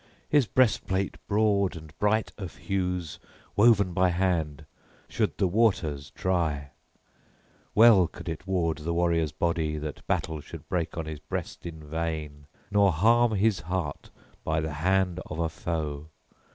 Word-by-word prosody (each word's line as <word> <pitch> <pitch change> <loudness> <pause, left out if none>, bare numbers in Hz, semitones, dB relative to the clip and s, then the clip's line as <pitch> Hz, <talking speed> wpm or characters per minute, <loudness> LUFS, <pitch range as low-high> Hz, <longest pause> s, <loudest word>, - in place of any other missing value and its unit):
His 145 -6 +3
breastplate 105 -6 +1
broad 100 -3 +2
and 80 -1 -11
bright 105 +1 +1
of 95 -5 -7
hues, 90 -5 -2 0.4
woven 100 -4 +5
by 90 +1 +3
hand, 85 -5 -1 0.4
should - - -1
the - - +2
waters 85 -8 +1
try; 80 -7 -1 1.0
well 110 -5 +7
could - - -11
it 80 +3 -5
ward 85 -5 0
the 85 +3 -2
warrior's 85 -3 +1
body 80 -3 -1
that 75 -1 -6
battle 80 -2 -1
should - - -11
break 85 -3 -2
on 80 - -2
his 80 -1 -6
breast 75 - -5
in 80 -2 -8
vain 75 -2 -4 0.2
nor 100 -1 +5
harm 115 +7 +4
his 105 -1 +2
heart 85 -3 -4 0.3
by 80 0 0
the 80 -1 -3
hand 90 +3 +1
of 80 - -6
a 85 -1 0
foe. 80 -3 -4
85 Hz, 145 wpm, -27 LUFS, 80-95 Hz, 1.0 s, well